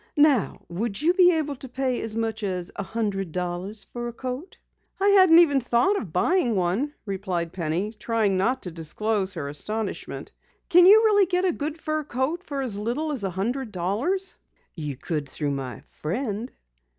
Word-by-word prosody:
"Now 290 - +3
would 200 +4 -3
you 330 +4 +3
be 360 -1 +6
able 300 -3 -1
to 265 - -9
pay 255 0 -1
as 220 -1 -4
much 225 0 -2
as 185 -3 -3
a - - -3
hundred 195 -3 -2
dollars 180 +4 -4
for 240 -1 -6
a 235 - -6
coat?" 255 +8 -6 0.4
"I 400 +1 +4
hadn't 375 -4 +7
even 300 -5 +6
thought 245 - +2
of 205 - -4
buying 240 - +2
one," 195 +12 0
replied 185 -4 -3
Penny, 180 +4 -2
trying 220 -3 0
not 240 +8 +1
to 180 - -5
disclose 190 +5 -1
her 150 -4 -4
astonishment. 210 +9 -4 0.4
"Can 355 +1 +7
you 435 +3 +8
really 410 -3 +5
get 360 +1 +1
a 360 - +2
good 305 +2 -4
fur 310 0 -2
coat 290 +6 -2
for 280 -6 -3
as 210 -6 -1
little 255 +9 -2
as 265 -8 -2
a 195 - 0
hundred 225 +7 -2
dollars?" 235 - -1 0.4
"You 150 -6 -5
could 150 -1 -3
through 145 0 -2
my 130 -4 -5
friend." 215 - -4
225 Hz, 180 wpm, -25 LUFS, 185-295 Hz, 0.4 s, you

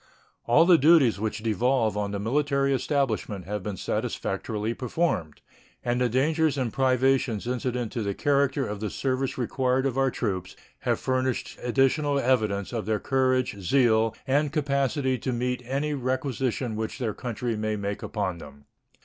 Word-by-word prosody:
All 145 +8 +5
the 175 -2 +6
duties 140 -8 +5
which 110 0 -3
devolve 115 0 +1
on 105 -1 -1
the 100 - -3
military 140 +4 +1
establishment 115 - -1
have 105 +2 -3
been 100 0 -5
satisfactorily 110 +5 -2
performed, 125 - -2 0.4
and 120 +1 0
the 125 - +2
dangers 150 +4 +1
and 125 -5 -1
privations 130 -4 +2
incident 125 -1 -2
to 120 - -3
the 100 -2 -2
character 140 -1 +1
of 105 -2 -5
the 105 0 -3
service 130 +2 -2
required 130 +1 0
of 135 -1 0
our 135 0 +3
troops 95 -6 -3 0.2
have - - 0
furnished 130 0 -1
additional 140 +3 +2
evidence 110 -6 +1
of 110 -4 -3
their 110 -1 +1
courage, 130 -5 +1
zeal, 110 +2 +3
and 145 +2 +1
capacity 140 -3 0
to 130 - -2
meet 125 +1 -1
any 140 +4 -1
requisition 130 -3 -2
which 110 0 -3
their 115 -5 -2
country 120 0 -3
may 110 0 -1
make 100 -1 -4
upon 95 -5 -3
them. 70 -2 -13
125 Hz, 160 wpm, -26 LUFS, 110-135 Hz, 0.4 s, the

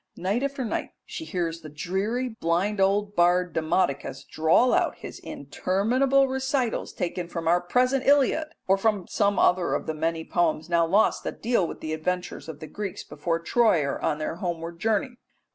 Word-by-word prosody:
Night 195 +7 0
after 275 -2 -2
night 220 - -3
she 320 - -7
hears 170 - -3
the 155 - -9
dreary 195 - -2
blind 195 0 0
old 205 +1 +2
bard 175 0 +3
Demodocus 155 -4 0
drawl 160 +11 +3
out - - +2
his - - -9
interminable 255 +8 +1
recitals 265 -2 -1
taken 175 0 -3
from 170 -1 -5
our 175 +2 +4
present 255 +8 +1
Iliad, 290 +2 +4 0.2
or 195 +1 +4
from 205 -3 +1
some 205 -1 +1
other 180 -1 +3
of - - -3
the 160 - -2
many 160 +1 -2
poems 165 -2 0
now 170 -1 +3
lost 200 +6 +3
that - - -6
dealt 225 -7 +2
with - - -8
the 155 0 -3
adventures 180 +1 -3
of 155 -1 -8
the - - -5
Greeks 200 +1 -5
before 165 -1 -2
Troy 220 -1 +3
or 140 0 -3
on 150 - 0
their 155 +2 -4
homeward 170 -2 -4
journey. 225 +5 0
185 Hz, 180 wpm, -26 LUFS, 165-230 Hz, 0.2 s, our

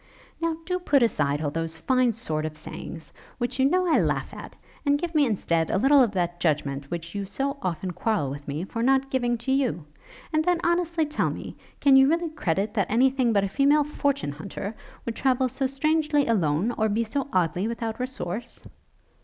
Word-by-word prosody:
'Now 330 -1 0
do 360 +1 -1
put 285 -7 +3
aside 145 -9 +1
all 145 - -1
those 165 +1 -3
fine 255 +7 +2
sort 160 -9 -3
of 155 -1 -9
sayings, 160 +1 -8 0.2
which 250 +1 -3
you 265 - +4
know 365 +3 +2
I 325 - +4
laugh - - -1
at, - - -9 0.3
and 285 -1 +3
give 340 +2 -4
me, 295 -3 +4
instead, 170 -7 0
a - - +1
little 270 +6 +5
of 245 - +4
that 175 -2 -1
judgment 145 -4 -1
which 170 -1 -5
you 200 -1 -3
so 275 +9 -3
often 185 0 -2
quarrel 185 -7 -1
with 145 +1 -8
me 145 +4 -3
for 230 +4 -4
not 270 +2 +2
giving 245 -2 +1
to 235 +3 -3
you; 255 - 0 0.5
and 310 0 +3
then 355 0 +2
honestly 340 -1 +1
tell 300 0 0
me, - - -7 0.2
can 275 -2 +5
you 270 +1 +7
really 335 +1 +1
credit 200 - -1
that 200 -6 +1
any 250 +5 +4
thing 255 -3 +1
but 200 -3 +3
a - - +1
female 280 +8 +3
fortune 280 - -1
hunter, 190 +7 -6 0.3
would 235 - -3
travel 260 -1 +2
so 265 +2 -1
strangely 300 +1 +1
alone, 185 -1 +1
or 220 0 +2
be 220 +3 +1
so 270 +5 -2
oddly 180 +1 +1
without 230 -1 -4
resource?' 245 -3 -5
235 Hz, 205 wpm, -26 LUFS, 175-280 Hz, 0.5 s, you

